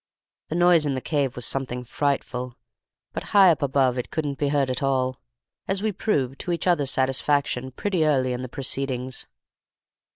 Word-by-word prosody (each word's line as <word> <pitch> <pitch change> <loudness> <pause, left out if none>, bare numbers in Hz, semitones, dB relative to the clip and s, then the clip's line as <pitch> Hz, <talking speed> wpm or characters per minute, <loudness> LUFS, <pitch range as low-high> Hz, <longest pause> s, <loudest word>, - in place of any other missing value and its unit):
The 155 - -3
noise 175 -3 +4
in 140 - 0
the - - -1
cave 140 -2 -1
was 125 - -2
something 125 -2 -2
frightful, 125 -2 -2 0.6
but - - -4
high 190 -3 +8
up 160 - -1
above 135 -2 +2
it 125 - -4
couldn't 145 -4 -3
be 145 - +1
heard 140 -2 +1
at 125 - -3
all, 130 -2 0 0.5
as 195 +1 -1
we 220 - +1
proved 140 - -1
to 180 - -3
each 170 - -2
other's 160 -7 +2
satisfaction 135 -1 +1
pretty 180 +5 -1
early 130 -4 +2
in 125 - -4
the 130 - -6
proceedings. 130 -1 -3
135 Hz, 175 wpm, -24 LUFS, 130-155 Hz, 0.6 s, high